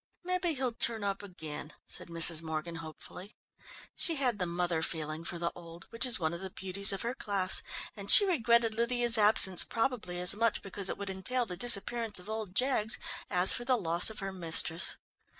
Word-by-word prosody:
"Maybe 360 -2 -2
he'll 255 -2 -3
turn 225 -2 -4
up 200 -1 -3
again," 160 -6 -9
said - - -5
Mrs. 165 -1 +3
Morgan 160 +1 -6
hopefully. 165 +4 -12 0.6
She 335 - +1
had 250 -7 -1
the 180 - -2
mother 175 -1 -2
feeling 155 0 -5
for 170 - -7
the 170 0 -3
old, 170 -1 -13
which 230 +3 -1
is 245 - +1
one 160 -1 -2
of 170 - -6
the 190 +1 -7
beauties 190 +1 0
of 195 +2 -5
her 235 +2 -3
class, 200 -6 0 0.3
and 200 -1 -10
she 410 - +9
regretted 235 - +1
Lydia's 235 0 +2
absence 205 -3 +7
probably 225 -7 -3
as 180 +1 +3
much 230 +2 -1
because 195 -1 -1
it - - -4
would 200 -1 -5
entail 240 +7 -2
the 180 - -6
disappearance 230 +1 +2
of 180 +4 -8
old 215 -4 -6
Jaggs 250 -3 +1 0.3
as 180 0 +4
for 245 - -5
the 255 0 +1
loss 170 -2 +4
of 220 -1 -8
her 195 0 -5
mistress. 165 -1 +2
200 Hz, 195 wpm, -30 LUFS, 175-235 Hz, 0.6 s, she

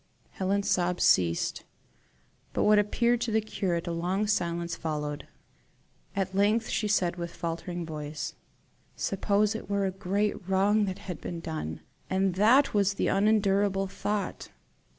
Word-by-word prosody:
Helen's 200 +1 -1
sobs 180 0 +1
ceased, 85 -2 +2 0.9
but - - +1
what 210 0 +6
appeared 235 +3 +2
to 230 - -1
the 220 - +3
curate 185 -5 -2
a 175 - -3
long 180 +5 0
silence 170 -4 -1
followed. 150 -3 -4 0.9
At 195 -1 -1
length 210 +3 +2
she 215 - 0
said, 180 -4 +1
with 170 -1 -5
faltering 170 +1 -4
voice: 150 -1 -5 0.6
"Suppose 200 +2 +1
it 220 - -7
were 200 -1 +1
a 190 - 0
great 195 +1 -2
wrong 205 +3 +3
that 190 -1 -4
had 180 -4 -6
been 170 -1 -5
done, 155 - -5 0.3
and 190 0 +1
that 235 +9 +4
was 200 -1 +2
the - - 0
unendurable 200 -1 +2
thought? 205 +1 -3
195 Hz, 145 wpm, -28 LUFS, 170-205 Hz, 0.9 s, what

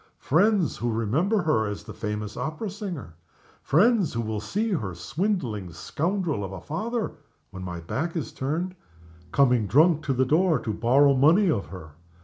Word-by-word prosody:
Friends 190 +3 +2
who 120 0 -1
remember 155 - +1
her 110 -9 +2
as 105 0 -5
the - - -9
famous 105 -1 -4
opera 155 - -4
singer. 185 - -6 0.5
Friends 205 - +3
who 115 - -1
will 110 -1 -3
see 210 - -1
her 105 - -2
swindling 115 - -2
scoundrel 160 - -2
of 95 - -5
a 95 - -6
father 215 - -3 0.4
(when 95 - -8
my 90 -2 -5
back 165 - -3
is 160 - -3
turned) 165 +7 -3 0.6
coming 125 -6 +3
drunk 155 - +4
to 135 - +1
the 130 +1 +2
door 160 +4 +3
to 115 -2 -3
borrow 135 +6 +4
money 165 +8 +4
of 100 - -2
her! 85 -5 -10
140 Hz, 165 wpm, -26 LUFS, 110-180 Hz, 0.6 s, drunk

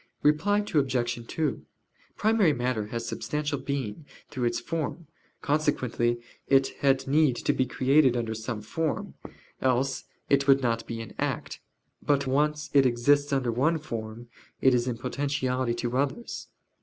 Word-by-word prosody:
Reply 200 +8 +3
Obj. 120 -5 0
2: 150 -7 -2 0.5
Primary 215 -7 +3
matter 120 -4 -1
has 115 +1 -4
substantial 150 +3 -2
being 135 -1 -4 0.2
through 125 -3 -2
its 120 0 0
form, 165 +5 -4 0.4
consequently 125 -5 +1 0.3
it 135 -1 +4
had 135 -1 +2
need 145 -2 +3
to - - 0
be 130 - +1
created 130 0 +3
under 115 -2 -2
some 110 -1 -5
form: 160 +7 -2 0.5
else 130 +1 +1 0.2
it 140 0 +2
would 135 -1 +5
not 115 -1 0
be 115 0 -4
in 110 - -9
act. - - -2 0.4
But 140 -1 +1
when 130 - -1
once 150 +1 0
it 140 -2 +6
exists 145 +5 +2
under 130 -3 +1
one 145 +8 +2
form 115 -5 -6 0.3
it 130 - +5
is 120 0 +1
in 120 -2 -2
potentiality 130 -1 -1
to 120 +1 -3
others. 140 - -2
130 Hz, 150 wpm, -27 LUFS, 120-145 Hz, 0.5 s, it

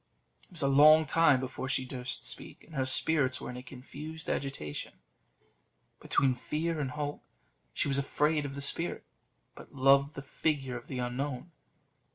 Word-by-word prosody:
It - - -22
was 165 -3 -3
a - - +3
long 155 +3 +7
time 150 -2 +4
before 130 0 -5
she 130 - 0
durst 125 0 -4
speak, - - -3
and 165 - -17
her 135 -2 -1
spirits 130 -1 +3
were - - -6
in 125 - -8
a - - -7
confused 145 +5 -7
agitation 130 - -4 1.1
between 135 -2 +2
fear 155 +6 -3
and 140 -3 -2
hope. 145 0 -4 0.5
She - - -1
was 140 0 +1
afraid 150 +2 +1
of 140 -1 -6
the 140 - -5
spirit, 165 +4 0 0.5
but - - -14
loved 140 +2 +4
the 135 - -7
figure 135 -3 -2
of 120 - -8
the 130 - -5
unknown. 125 +5 -4
140 Hz, 170 wpm, -30 LUFS, 130-150 Hz, 1.1 s, long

